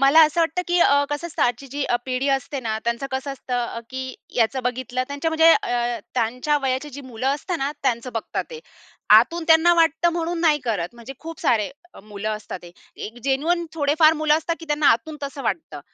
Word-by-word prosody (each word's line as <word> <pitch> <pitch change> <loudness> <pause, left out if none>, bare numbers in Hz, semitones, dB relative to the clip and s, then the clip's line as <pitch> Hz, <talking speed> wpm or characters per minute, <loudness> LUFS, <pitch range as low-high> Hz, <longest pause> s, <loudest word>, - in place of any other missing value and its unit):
मला 275 +4 +6
असं 310 +3 -1
वाटतं 330 +2 +1
की 350 0 +2
अ, 285 -3 +5
कसं 290 +3 -3
असतं 340 - -2
आजची 245 +3 0
जी 285 0 -3
अ, 240 - +1
पिढी 260 +2 -1
असते 270 +1 -6
ना 220 -2 -2
त्यांचं 235 +3 -1
कसं 265 +1 -3
असतं 255 -1 -6
अ, 230 - -6
की 260 0 -5 0.2
याचं 250 +3 +1
बघितलं 255 0 -2
त्यांच्या 285 +3 -2
म्हणजे 320 +1 +6
अ, 240 - 0 0.2
त्यांच्या 250 +5 0
वयाची 265 +3 -1
जी 285 - -8
मुलं 255 -2 -6
असतात 315 +5 -1
ना, 275 +1 -1
त्यांच 235 -2 0
बघतात 225 - -3
ते. 470 -1 -8 0.5
आतून 340 -1 +6
त्यांना 325 +2 +6
वाटतं 330 +1 +3
म्हणून 340 0 -2
नाही 310 -3 +4
करत, 205 -8 -1
म्हणजे 235 +3 -9
खूप 330 +1 -8
सारे 225 -1 +1 0.2
अ, - - -12
मुलं 210 +1 -5
असतात 205 -3 -8
ते. 175 0 -12 0.2
एक 225 +3 -7
जेन्युइन 325 +6 +1
थोडे 290 -1 +1
फार 315 -1 +7
मुलं 300 -1 +4
असतात 330 +1 -3
की 330 - -9
त्यांना 295 0 +1
आतून 300 +6 0
तसं 275 0 -5
वाटतं. 165 -8 -3
275 Hz, 210 wpm, -23 LUFS, 245-320 Hz, 0.5 s, फार